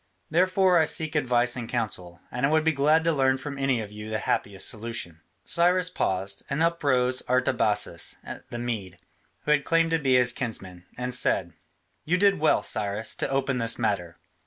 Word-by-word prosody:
Therefore 185 +1 +3
I 160 - +4
seek 155 -1 -2
your 150 - +2
advice 120 -1 +1
and 120 -3 -6
counsel, 90 -7 -4
and 125 - -4
I 140 - +4
would 155 0 +2
be 160 - +3
glad 155 +2 +3
to 165 0 +2
learn 135 -2 +2
from 140 +1 -7
any 135 -3 +1
of 105 -1 -8
you 105 +1 -8
the 110 - -1
happiest 100 -2 -1
solution." 105 -7 -4 0.2
Cyrus 180 +1 +2
paused, 95 - -2
and 140 +4 0
up 170 -1 0
rose 130 -2 +2
Artabazus 105 -8 +1 0.3
the 120 - -6
Mede, 115 -6 -4 0.4
who 150 - -1
had 150 -2 +3
claimed 165 +1 +2
to 165 - +2
be 135 -3 +2
his 125 -1 +4
kinsman, 95 -8 -5
and 125 0 -3
said: 95 -8 +1 0.5
"You 175 +3 +1
did 200 -1 +3
well, 155 - +3
Cyrus, 105 +2 -1
to - - -2
open 135 -1 0
this 115 -1 0
matter. 95 -7 -2
125 Hz, 190 wpm, -26 LUFS, 105-155 Hz, 0.5 s, I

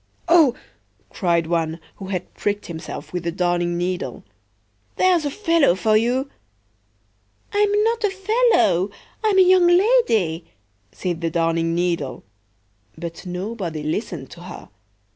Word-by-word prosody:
"O!" 320 -8 +5 0.6
cried 170 -4 +1
one, 165 0 -1 0.2
who 195 - -8
had 185 -2 -4
pricked 205 0 -2
himself 165 +1 -8
with 180 -1 -3
the 170 - -1
Darning 175 -1 0
needle, 180 +1 -3 0.7
"there's 360 -4 +3
a - - 0
fellow 330 - +2
for 215 +3 +2 1.6
you!""I'm 415 0 +3
not 460 0 0
a 415 - +3
fellow; 380 - +2 0.3
I'm 425 -3 +2
a 380 - +8
young 365 -1 +5
lady!" 350 - +3 0.5
said 175 -3 -4
the 165 - 0
Darning 165 0 0
needle. 170 -6 -2 0.7
But 170 +2 -7
nobody 180 -4 -4
listened 155 +1 -4
to - - -12
her. - - -10
185 Hz, 125 wpm, -22 LUFS, -, 1.6 s, a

